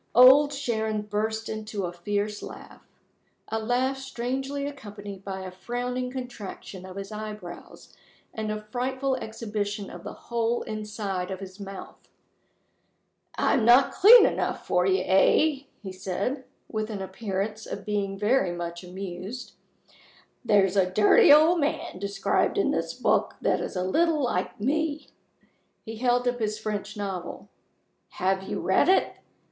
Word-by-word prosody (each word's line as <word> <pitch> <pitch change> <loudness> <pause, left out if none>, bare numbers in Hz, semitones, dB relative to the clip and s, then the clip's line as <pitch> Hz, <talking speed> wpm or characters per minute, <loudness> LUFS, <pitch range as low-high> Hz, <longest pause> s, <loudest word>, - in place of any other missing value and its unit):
Old 265 +4 +8
Sharon 220 -6 -1
burst 220 +1 -2
into 215 -2 -4
a 175 - -5
fierce 205 +4 -2
laugh - - -10 0.7
a 225 - -1
laugh 250 +4 0
strangely 270 +2 -3
accompanied 205 -8 -8
by 190 -1 -5
a 185 -1 -6
frowning 245 +6 -3
contraction 225 -7 -7
of 185 - -10
his 195 +1 -6
eyebrows, 210 -4 -8 0.4
and 215 -1 -3
a 215 0 -4
frightful 260 +2 -1
exhibition 210 -3 -4
of - - -10
the - - -6
whole 235 0 -1
inside 210 -4 -4
of 190 -1 -5
his 190 0 -10
mouth. 195 -1 -9 1.3
"I'm 240 - +2
not 245 +4 +6
clean 455 +6 +9
enough - - -1
for 180 +1 +2
you 190 -1 +2
eh?" 275 +10 +3 0.2
he 190 - -5
said, 195 +8 -3 0.2
with 215 0 -3
an 200 -3 -4
appearance 200 +2 -4
of - - -6
being 200 -2 -1
very 210 -2 +2
much 170 0 -5
amused. 190 +6 -7 0.9
"There's 200 -4 +3
a 190 -2 +3
dirty 205 +7 +6
old 315 +4 +7
man 285 - -2
described 200 0 0
in - - +2
this - - -2
book - - +1
that - - +1
is - - -5
a 180 - 0
little 310 - +2
like 180 -6 -2
me." 305 +6 -1 0.8
He 225 0 -7
held 245 +1 +2
up 245 0 0
his 215 -1 -1
French 210 -1 -4
novel. 190 -3 -5 0.6
"Have 190 +1 0
you 190 - -4
read 190 - +3
it? 380 - +3
215 Hz, 145 wpm, -26 LUFS, 195-250 Hz, 1.3 s, clean